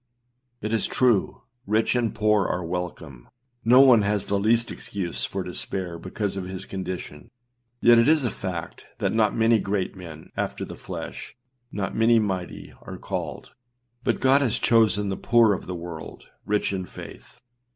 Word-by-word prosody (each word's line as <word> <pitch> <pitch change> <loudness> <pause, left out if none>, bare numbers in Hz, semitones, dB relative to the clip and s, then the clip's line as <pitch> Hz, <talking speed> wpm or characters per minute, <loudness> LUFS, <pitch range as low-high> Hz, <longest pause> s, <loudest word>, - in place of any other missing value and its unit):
It 110 +2 -3
is 115 - +2
true, 120 -6 +1 0.2
rich 110 +4 +2
and 120 -2 0
poor 105 -2 +2
are 90 -1 -2
welcome; 80 -7 -6 0.3
no 125 +4 +7
one 125 -5 +7
has 105 0 0
the 100 - 0
least 115 +3 +2
excuse 95 -4 -3
for - - -4
despair 90 -3 -4
because 95 +3 -3
of 95 - -4
his 95 +1 -6
condition; 90 -6 -6 0.5
yet 120 0 +7
it 115 - +4
is 155 -2 +4
a 120 - 0
fact 90 -4 -6
that - - 0
ânot 110 -1 +2
many 115 0 +4
great 95 -1 -2
men,â 80 -4 -11
after - - -3
the - - -9
flesh, - - -7 0.4
ânot 100 -2 -3
many 115 +1 +4
mighty,â 95 -5 -3
are - - -8
called, - - -5 0.5
but - - 0
âGod 135 +2 +5
hath 125 -6 +1
chosen 105 -3 +3
the 95 - -1
poor 115 -3 +4
of 95 - -5
this 90 - -4
world 85 -2 -8
â - - -24 0.2
rich 105 -1 0
in 95 -2 -3
faith. - - -12
100 Hz, 170 wpm, -25 LUFS, 90-115 Hz, 0.5 s, no